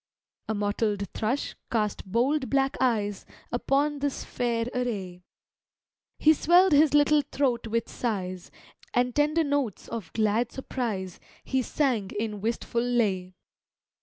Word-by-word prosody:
A 220 - 0
mottled 205 0 -1
thrush 245 +6 -2 0.2
cast 210 -4 -1
bold 260 +5 +1
black 270 -1 +2
eyes 210 -6 +1 0.3
Upon 280 +4 +1
this 285 -1 -2
fair 235 -2 -1
array, 200 -8 -3 1.0
He 315 - +6
swell'd 350 +5 +5
his 295 0 +5
little 295 0 +5
throat 250 -4 0
with 230 +1 -1
sighs, 185 -6 -3 0.5
And 245 0 +2
tender 300 +3 +3
notes 285 -8 -1
of 225 -8 -6
glad 220 +2 +1
surprise 215 -9 -4 0.2
He 265 -1 0
sang 245 -7 0
in 210 -1 -3
wistful 235 +1 -1
lay. 205 -7 0
235 Hz, 125 wpm, -27 LUFS, 210-275 Hz, 1.0 s, He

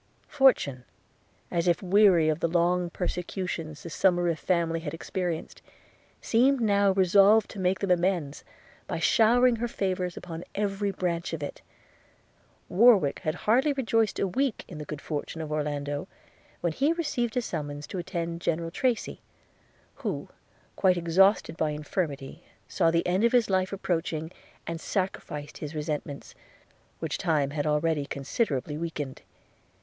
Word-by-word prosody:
Fortune, 255 - +3 0.7
as 170 0 0
if 175 +3 +2
weary 185 -4 +5
of 155 0 +1
the 170 - +1
long 175 +1 +1
persecutions 175 -3 -4
the 170 - -6
Somerive 175 -1 +2
family 170 -2 0
had 160 -1 -5
experienced, 175 -1 -4 0.6
seemed 260 +4 +3
now 200 -3 +3
resolved 195 +3 +5
to 205 - -8
make 185 0 +1
them 195 -2 0
amends 175 -5 0 0.4
by - - -3
showering 235 +9 +4
her 240 +2 -1
favours 185 -5 -2
upon 170 -1 -7
every 200 0 -1
branch 175 -3 -2
of 155 -3 -4
it. 145 - -6 1.1
Warwick 195 - +5
had 155 - -2
hardly 260 +7 +3
rejoiced 225 -5 +1
a 195 - +1
week 255 +6 -1
in 160 - -9
the 150 - -6
good 150 0 -7
fortune 155 +1 -4
of 155 -1 -5
Orlando, 145 +1 -2 0.5
when 170 -2 0
he 285 - +2
received 255 -9 -2
a - - +3
summons 145 -5 -5
to 190 - -5
attend 170 -1 -4
General 165 0 -1
Tracy; 245 +3 -1 0.8
who, - - -4 0.5
quite 185 -2 +3
exhausted 175 +1 +3
by 155 - +1
infirmity, 150 -2 -4 0.2
saw 170 -3 +2
the 170 +1 +1
end 185 +4 +1
of 235 - +3
his 235 -5 +3
life 185 0 +1
approaching, 165 -4 -2 0.3
and 165 0 -5
sacrificed 150 -6 -4
his 150 +1 -6
resentment, 150 -2 -4 0.6
which - - -3
time 150 -5 +1
had 150 0 -2
already 150 -1 +1
considerably 145 - -2
weakened. 150 -5 -5
175 Hz, 145 wpm, -27 LUFS, 155-200 Hz, 1.1 s, weary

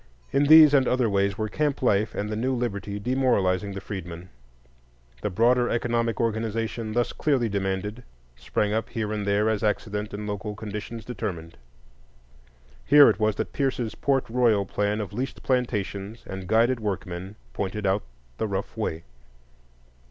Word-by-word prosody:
In 140 +1 +3
these 155 0 +9
and 135 -3 +4
other 125 -2 +2
ways 100 -1 +1
were 110 - -1
camp 145 +4 -1
life 105 -3 +2
and 105 - -2
the 105 - -3
new 130 +4 0
liberty 100 -4 -3
demoralizing 100 -6 +1
the 100 - -5
freedmen. 90 -3 -7 0.9
The 105 - -1
broader 120 +5 +3
economic 115 -1 0
organization 115 0 -2
thus 120 +1 0
clearly 135 -6 +1
demanded 100 +2 -2 0.3
sprang 105 +10 -1
up 110 +1 -1
here 110 -2 -3
and 105 -1 -3
there 100 +2 +2
as 110 -1 0
accident 105 0 -1
and 105 +1 -5
local 105 0 -4
conditions 105 +2 -6
determined. 95 -8 -5 1.3
Here 145 -3 +8
it 105 - -6
was 110 -1 +2
that - - -4
Pierce's 130 -5 -1
Port 135 -2 0
Royal 115 -4 +2
plan 105 +2 -1
of 100 -2 -6
leased 130 +5 -4
plantations 110 -4 -2
and 95 -1 -7
guided 115 +4 +3
workmen 95 -2 -4 0.2
pointed 100 +4 -3
out 95 +2 +2 0.4
the - - 0
rough - - -4
way. 80 +1 -3
105 Hz, 155 wpm, -25 LUFS, 100-120 Hz, 1.3 s, these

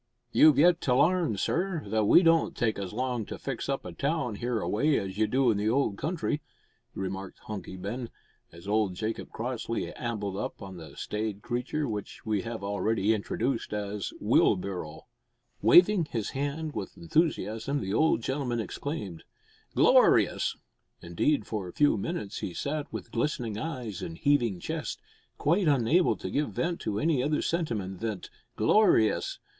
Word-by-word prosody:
"You've 155 -3 +6
yet 170 +3 +5
to 125 - +2
larn, 160 - +3
sir, 170 - -1
that 110 0 +2
we 175 - +7
don't 165 -1 +3
take 110 -4 0
as 95 -2 -4
long 125 0 -2
to - - -6
fix 135 -1 -4
up 135 - -2
a - - -5
town 140 -5 -1
hereaway 120 +5 0
as 95 +1 -4
you 110 - +3
do 125 +2 +3
in 105 - 0
the 105 +1 +1
old 125 -4 +1
country," 155 -1 -1 0.5
remarked 95 0 -5
Hunky 100 -3 -6
Ben, 115 +6 -5 0.4
as 85 +3 -13
old 105 -3 +1
Jacob 110 +4 -4
Crossley 115 0 -3
ambled 105 -5 -3
up - - -4
on 95 -3 -8
the 80 -2 -11
staid 105 -1 -3
creature 130 +5 -2
which 105 -3 -6
we 105 -3 0
have 115 0 -6
already 100 +1 +1
introduced 115 +3 -2
as 105 -1 -3
Wheelbarrow. 90 -5 +1 0.6
Waving 180 -1 +6
his 115 -7 -3
hand 145 +3 -3
with - - -6
enthusiasm 145 - 0
the 95 -4 -3
old 120 -3 +3
gentleman 130 -3 -1
exclaimed, 110 - -5 0.5
"Glorious!" - - +4 0.5
Indeed, 85 - +1
for 105 -4 -4
a 90 - -9
few 145 -4 +4
minutes 100 0 -4
he 90 - -5
sat 145 - -3
with - - -7
glistening 120 -8 -1
eyes 125 - -5
and 80 -1 -6
heaving 120 -9 +2
chest, - - -4 0.4
quite 170 +5 +2
unable 145 +5 +3
to - - -6
give 145 0 -1
vent 170 0 -1
to 105 - -2
any 155 -5 +2
other 150 +3 0
sentiment 110 - -2
than 110 -5 -3 0.3
"glorious!" 200 - +3
115 Hz, 160 wpm, -28 LUFS, 100-145 Hz, 0.6 s, we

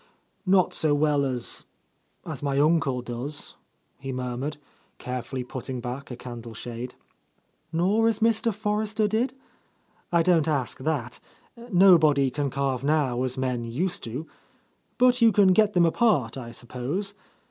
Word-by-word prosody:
"Not 185 -1 +4
so 150 -2 +2
well 145 -1 +2
as 130 -3 -3 0.3
— - - -42
as - - -6
my 140 -1 -1
uncle 145 -5 +2
does," 125 +5 -5 0.5
he 135 -1 -5
mur 125 -1 -3
mured, 145 +4 -4 0.4
carefully 125 +1 -4
putting 130 0 -6
back 125 +3 -6
a 125 - -5
candle 120 -2 -9
shade. 120 +2 -6 0.8
"Nor 195 +7 +2
as 225 - +2
Mr. 230 0 +2
Forrester 210 +1 -1
did? 235 +5 0 0.8
I 170 -1 +4
don't 165 -3 +3
ask 140 -5 -1
that. 130 -4 -2 0.5
Nobody 160 -8 +5
can 145 +1 -1
carve 135 -1 -1
now 140 -4 +1
as 130 0 -2
men 125 -2 -1
used 150 +11 -2
to. 125 +7 -5 0.7
But 250 0 +4
you 230 -1 +7
can 195 -3 +5
get 215 0 +3
them 175 -1 +4
apart, 165 - +2
I 120 -3 -7
suppose? 130 - -4
145 Hz, 145 wpm, -26 LUFS, 125-185 Hz, 0.8 s, you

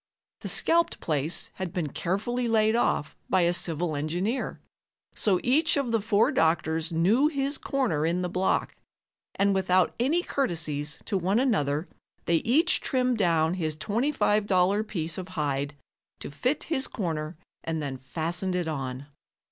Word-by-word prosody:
The - - -6
scalped 335 0 +2
place 155 +1 -1
had 185 -2 -4
been 165 -4 -2
carefully 225 - -2
laid 220 -1 +3
off 235 -10 0
by 185 - +3
a 175 0 +3
civil 170 -2 0
engineer, 175 - -2 0.5
so 190 -4 +2
each 300 +5 +3
of 270 -4 -1
the 225 -2 +1
four 215 0 +3
doctors 160 0 +1
knew 200 - +3
his 280 -1 -1
corner 240 - 0
in 170 +3 0
the - - 0
block, 185 +1 0 0.6
and 200 0 +2
without 185 -1 +2
any 310 +9 +2
courtesies 155 - -2
to 195 - -1
one 190 +4 +1
another 155 - +1 0.4
they 170 - +3
each 300 - +2
trimmed 255 -3 0
down 165 -3 +2
his 160 -4 -2
$25 205 - +1
piece 165 -3 -3
of 185 - -6
hide 145 -1 -1 0.4
to - - -7
fit 255 - -1
his 275 -5 -1
corner 160 -5 -4 0.3
and 160 -1 -2
then 135 -3 -4
fastened 170 +7 -3
it 175 -2 -1
on. 135 -3 -4
180 Hz, 150 wpm, -27 LUFS, 160-230 Hz, 0.6 s, laid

